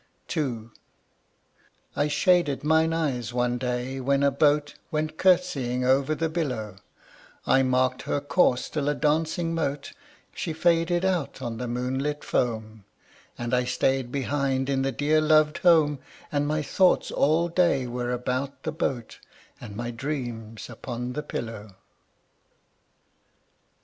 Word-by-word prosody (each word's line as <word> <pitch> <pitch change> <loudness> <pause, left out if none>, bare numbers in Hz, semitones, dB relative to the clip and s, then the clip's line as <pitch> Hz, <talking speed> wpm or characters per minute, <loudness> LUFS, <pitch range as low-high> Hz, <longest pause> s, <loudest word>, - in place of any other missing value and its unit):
II. 120 -7 -2 1.2
I 145 - +1
shaded 150 -3 +2
mine 160 +1 +3
eyes 130 -8 -1
one 120 0 0
day 125 +1 -2
when 140 +2 +1
a 140 - +4
boat 145 +1 +2 0.2
Went 155 0 -2
curtseying 140 -10 +2
over 135 +4 +2
the 165 +1 0
billow, 125 - -3 0.7
I 135 - +4
marked 130 0 +1
her - - +1
course 145 -3 +2
till 145 -2 -1
a 145 - 0
dancing 160 +3 0
mote 140 -3 -2 0.4
She 165 - -3
faded 170 +2 +2
out 180 -8 -1
on 120 -3 -4
the 125 - -3
moonlit 130 +5 -2
foam, 110 -3 -2 0.5
And 120 0 -4
I 125 0 +3
stayed 130 0 0
behind 135 0 -1
in 135 -1 +1
the 135 0 0
dear 150 +4 +2
loved 155 -1 +3
home; 155 -5 +4 0.3
And 145 0 0
my 155 0 0
thoughts 185 +5 +2
all 160 +4 +2
day 170 -6 +2
were 120 0 -3
about 130 +3 -3
the 160 - -2
boat, 135 -7 -3 0.4
And 100 - -9
my 120 +2 -4
dreams 115 -4 -5
upon 120 +1 -6
the 150 - -3
pillow. 110 -8 -6
140 Hz, 135 wpm, -26 LUFS, 125-155 Hz, 1.2 s, a